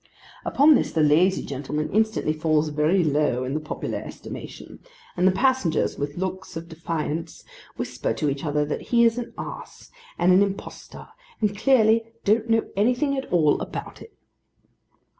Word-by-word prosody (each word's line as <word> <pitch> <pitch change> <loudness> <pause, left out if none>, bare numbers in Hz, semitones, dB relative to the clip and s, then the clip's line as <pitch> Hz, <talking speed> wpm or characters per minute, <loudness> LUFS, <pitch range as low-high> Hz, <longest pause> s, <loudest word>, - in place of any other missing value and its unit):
Upon 295 +3 +5
this 270 - +1
the 160 - +2
lazy 170 +6 +3
gentleman 145 +2 -4
instantly 220 -6 +1
falls 155 -1 +1
very 155 +5 +2
low 145 -4 +1
in 130 +1 -3
the 155 - 0
popular 155 - -4
estimation, - - -9 0.4
and 180 +1 +3
the - - +5
passengers, 220 - +1
with 145 +2 -4
looks 185 -1 -4
of 165 +1 -7
defiance, 165 -1 -4 0.3
whisper - - -3
to 155 - -2
each 140 -1 -2
other 150 -1 0
that 145 - -3
he 235 -1 +5
is 230 +1 +2
an 240 - -6
ass, - - -9 0.3
and 180 +1 +4
an 185 - +6
impostor, 200 -1 -5 0.3
and 210 -2 0
clearly 225 -1 +3
don't 220 +2 +2
know 225 0 +3
anything 250 +7 +1
at 270 - -5
all 160 -4 +3
about - - -7
it. 450 - -14
180 Hz, 160 wpm, -24 LUFS, 150-220 Hz, 0.4 s, an